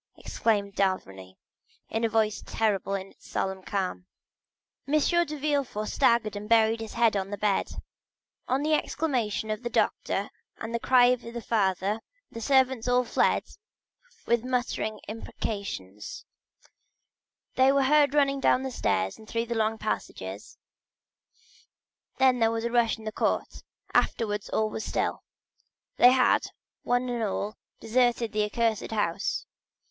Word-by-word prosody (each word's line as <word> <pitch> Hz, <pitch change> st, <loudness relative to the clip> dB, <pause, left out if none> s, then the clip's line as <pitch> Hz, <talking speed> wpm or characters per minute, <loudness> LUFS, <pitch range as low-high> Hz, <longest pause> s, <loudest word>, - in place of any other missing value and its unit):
replied 205 Hz, -3 st, -1 dB
d'Avrigny, 95 Hz, -, -2 dB, 0.5 s
in 225 Hz, +1 st, -2 dB
a 230 Hz, -, +2 dB
voice 215 Hz, -1 st, +1 dB
terrible 200 Hz, -3 st, 0 dB
in 195 Hz, 0 st, -6 dB
its -, -, -20 dB
solemn 190 Hz, 0 st, -2 dB
calmness. 185 Hz, -2 st, -3 dB, 0.8 s
50085m 305 Hz, +4 st, +2 dB
M. 345 Hz, -, +3 dB
de 300 Hz, -, -5 dB
Villefort 280 Hz, -7 st, -1 dB
staggered 225 Hz, -3 st, +2 dB
and 205 Hz, +1 st, -6 dB
buried 225 Hz, 0 st, +4 dB
his 225 Hz, -1 st, -7 dB
head 230 Hz, -2 st, +3 dB
in 195 Hz, -1 st, -1 dB
the 205 Hz, -, -4 dB
bed. 205 Hz, -2 st, 0 dB, 0.7 s
On 265 Hz, +3 st, 0 dB
the 310 Hz, +1 st, +1 dB
exclamation 245 Hz, -9 st, -1 dB
of 215 Hz, +1 st, -3 dB
the 240 Hz, -, -3 dB
doctor -, -, 0 dB, 0.3 s
and 225 Hz, +1 st, -6 dB
the 235 Hz, -, 0 dB
cry 250 Hz, 0 st, +5 dB
of 250 Hz, -1 st, +1 dB
the 235 Hz, 0 st, -7 dB
father, 205 Hz, -1 st, 0 dB, 0.3 s
the 230 Hz, -, -7 dB
servants 260 Hz, -2 st, +2 dB
all 250 Hz, 0 st, +3 dB
fled -, -, +2 dB, 0.8 s
with 235 Hz, -1 st, +2 dB
muttered 250 Hz, -3 st, -1 dB, 0.2 s
imprecations; 200 Hz, -, -6 dB, 1.3 s
they 260 Hz, +1 st, +5 dB
were 275 Hz, 0 st, +3 dB
heard 290 Hz, +1 st, +4 dB
running 275 Hz, -1 st, +3 dB
down 260 Hz, -1 st, +3 dB
the 265 Hz, -, -3 dB
stairs 95 Hz, -, -1 dB
and 220 Hz, -, -14 dB
through 230 Hz, 0 st, -1 dB
the 235 Hz, -, -3 dB
long 220 Hz, -1 st, 0 dB
passages, 100 Hz, -, -5 dB, 1.6 s
then 260 Hz, -1 st, +4 dB
there 225 Hz, -1 st, +4 dB
was 225 Hz, 0 st, -2 dB
a 235 Hz, -, -1 dB
rush 235 Hz, -2 st, +2 dB
in 220 Hz, -, -13 dB
the 215 Hz, -, -4 dB
court, -, -, -1 dB, 0.3 s
afterwards 210 Hz, -3 st, 0 dB
all 220 Hz, -, +1 dB
was 220 Hz, -, -4 dB
still; -, -, -1 dB, 0.8 s
they 245 Hz, -, +8 dB
had, 255 Hz, -1 st, +3 dB, 0.3 s
one 245 Hz, +1 st, 0 dB
and 240 Hz, -1 st, -2 dB
all, 210 Hz, 0 st, -2 dB, 0.2 s
deserted 240 Hz, -1 st, +1 dB
the 210 Hz, 0 st, +1 dB
accursed 225 Hz, 0 st, 0 dB
house. 200 Hz, -3 st, -1 dB
225 Hz, 150 wpm, -27 LUFS, 205-250 Hz, 1.6 s, they